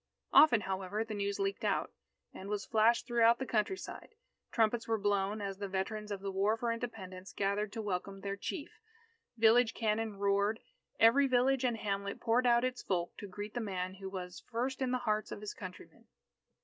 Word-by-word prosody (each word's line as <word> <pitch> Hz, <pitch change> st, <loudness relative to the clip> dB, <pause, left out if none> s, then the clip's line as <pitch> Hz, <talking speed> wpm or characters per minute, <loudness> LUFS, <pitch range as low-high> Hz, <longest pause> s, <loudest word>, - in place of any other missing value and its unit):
Often, 280 Hz, -7 st, +7 dB
however, 195 Hz, +2 st, -2 dB
the 225 Hz, -1 st, -6 dB
news 200 Hz, -1 st, -2 dB
leaked 195 Hz, 0 st, -2 dB
out, -, -, 0 dB, 0.4 s
and 195 Hz, -, -8 dB
was 210 Hz, 0 st, -2 dB
flashed 225 Hz, +1 st, +3 dB
throughout 235 Hz, -1 st, +4 dB
the 265 Hz, -, -3 dB
countryside. 255 Hz, -, -3 dB, 0.4 s
Trumpets 225 Hz, 0 st, +1 dB
were 225 Hz, -1 st, +1 dB
blown, 205 Hz, 0 st, 0 dB
as 195 Hz, -1 st, -4 dB
the 200 Hz, -, -3 dB
veterans 210 Hz, +3 st, -3 dB
of 200 Hz, -1 st, -4 dB
the 195 Hz, 0 st, -3 dB
War 200 Hz, +3 st, +1 dB
for 235 Hz, 0 st, -1 dB
Independence 195 Hz, -6 st, -6 dB
gathered 200 Hz, +1 st, -1 dB
to 225 Hz, -2 st, -4 dB
welcome 195 Hz, 0 st, -3 dB
their 200 Hz, 0 st, -3 dB
Chief. 345 Hz, -, -6 dB, 0.6 s
Village 230 Hz, +1 st, +5 dB
cannon 220 Hz, -1 st, -1 dB
roared. 200 Hz, +2 st, +1 dB, 0.4 s
Every 270 Hz, +5 st, +6 dB
village 260 Hz, +1 st, +3 dB
and 240 Hz, -3 st, +1 dB
hamlet 200 Hz, -1 st, -3 dB
poured 240 Hz, +2 st, +2 dB
out 240 Hz, 0 st, +4 dB
its 255 Hz, -1 st, -2 dB
folk 175 Hz, -2 st, -2 dB
to 205 Hz, -, -7 dB
greet 205 Hz, +2 st, -7 dB
the 240 Hz, -, -2 dB
man 185 Hz, -3 st, -3 dB
who 195 Hz, 0 st, -7 dB
was 180 Hz, -2 st, -7 dB
"first 250 Hz, +3 st, -2 dB
in 260 Hz, -, +1 dB
the 255 Hz, -, +1 dB
hearts 215 Hz, -3 st, -1 dB
of -, -, -5 dB
his 210 Hz, -, -5 dB
countrymen." 185 Hz, -2 st, -11 dB
210 Hz, 190 wpm, -33 LUFS, 195-235 Hz, 0.6 s, Often